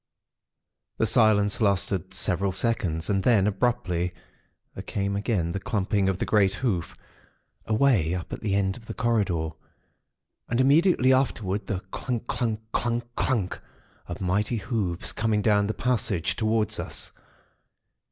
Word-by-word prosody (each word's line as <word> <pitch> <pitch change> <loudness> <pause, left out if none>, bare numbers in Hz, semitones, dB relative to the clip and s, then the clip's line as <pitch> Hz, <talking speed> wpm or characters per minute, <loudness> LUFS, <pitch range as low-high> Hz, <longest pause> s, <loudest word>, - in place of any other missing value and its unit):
"The - - +2
silence 110 -3 +3
lasted 95 -2 +1
several 95 0 0
seconds; 90 -5 -1
and 100 -2 +1
then, 105 -2 +4
abruptly, 95 -5 0 0.6
there - - -6
came 100 0 -2
again 100 -5 0
the 100 - -3
clumping 100 -1 0
of 95 - -1
the - - -2
great 100 -3 +3
hoof, 100 -10 -2 0.7
away 110 - +3
up 90 - -6
at - - -5
the 100 -3 0
end 95 -1 0
of 115 -2 -15
the 110 - -6
corridor. 100 -10 0 1.0
And 120 - 0
immediately 140 0 +4
afterwards, 105 -7 0
the 95 -3 -2
clungk, 120 -3 -3
clunck—clungk, 115 +1 -2
clunck, 105 -8 -1 0.5
of 85 - -6
mighty 100 +5 0
hoofs 100 -5 -1
coming 110 -2 0
down 105 -2 +3
the 110 - -1
passage, 105 -8 0
towards 110 -1 0
us. - - -3
105 Hz, 135 wpm, -26 LUFS, 95-115 Hz, 1.0 s, then